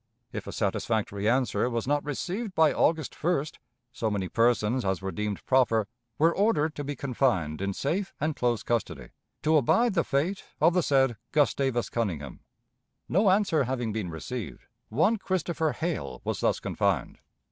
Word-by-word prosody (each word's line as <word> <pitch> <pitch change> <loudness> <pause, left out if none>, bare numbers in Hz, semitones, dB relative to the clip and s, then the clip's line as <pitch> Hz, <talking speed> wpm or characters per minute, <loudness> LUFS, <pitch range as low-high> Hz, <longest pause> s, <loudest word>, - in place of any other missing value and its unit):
If - - -5
a - - -4
satisfactory 105 -2 -1
answer 125 0 +1
was 115 -2 -2
not 145 +1 +1
received 185 - -4
by 160 -3 +5
August 160 -3 +1
1st, 155 -3 -1 0.3
so 115 -3 -2
many 100 -3 -2
persons 120 +1 +2
as 95 -2 0
were 95 0 -4
deemed 105 -1 -4
proper 115 -5 +3 0.3
were 165 +2 +3
ordered 190 -7 +2
to 145 - -5
be 145 +1 -4
confined 120 - 0
in 100 -1 -2
safe 185 +8 -1
and 155 +1 -1
close 120 -2 0
custody, 120 -1 -2 0.3
to 155 +1 +4
abide 225 - +3
the 170 -3 +2
fate 160 +8 -1 0.2
of 165 +3 +5
the 180 - +3
said 135 -6 +2
Gustavus 135 -4 +1
Conyngham. 85 - -3 0.7
No 195 +3 +3
answer 185 -7 +3
having 120 -3 -2
been 105 -5 -3
received, 105 +7 -6 0.3
one 165 - +2
Christopher 170 -5 -1
Hale 120 - -3
was - - -2
thus - - +1
confined. - - -1
135 Hz, 160 wpm, -28 LUFS, 110-160 Hz, 0.7 s, by